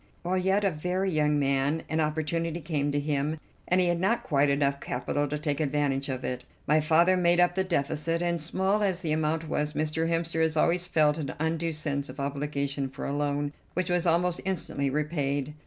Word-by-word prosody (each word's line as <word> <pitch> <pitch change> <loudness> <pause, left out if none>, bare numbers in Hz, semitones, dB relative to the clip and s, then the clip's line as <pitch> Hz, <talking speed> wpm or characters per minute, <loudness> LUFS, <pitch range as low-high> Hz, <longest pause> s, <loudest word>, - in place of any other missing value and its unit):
While 185 +2 0
yet 190 +3 +2
a 195 - +3
very 180 +4 -1
young 150 -2 +2
man 140 +3 +1
an 160 - -1
opportunity 160 +2 -1
came 150 -3 -1
to 145 - +1
him, 150 +1 -1 0.3
and 180 - +3
he 180 - +4
had 175 -1 +1
not 230 +6 +1
quite 145 - +2
enough 140 0 +1
capital 145 +3 -2
to 150 +2 -2
take 145 -2 -1
advantage 140 -2 0
of 130 -1 -3
it. 125 - -3 0.2
My 150 +2 +4
father 165 +4 +4
made 175 -1 +3
up 175 0 +4
the 190 +1 +1
deficit, 165 -1 -1
and, 170 -1 -1
small 190 +6 0
as 190 -3 +1
the 160 -4 -2
amount 155 +1 0
was, 150 0 -1
Mr. 155 +2 -1
Hemster 165 -1 0
has 160 -1 +1
always 175 +3 +2
felt 155 -3 +3
an 140 -4 -4
undue 160 +2 -1
sense 145 -2 -3
of - - -9
obligation 140 -1 -2
for 135 - -7
a 140 - -2
loan 145 0 -1 0.2
which 180 0 0
was 175 0 +1
almost 175 +1 +2
instantly 150 -7 -1
repaid. 145 -1 -1
155 Hz, 205 wpm, -28 LUFS, 145-175 Hz, 0.3 s, he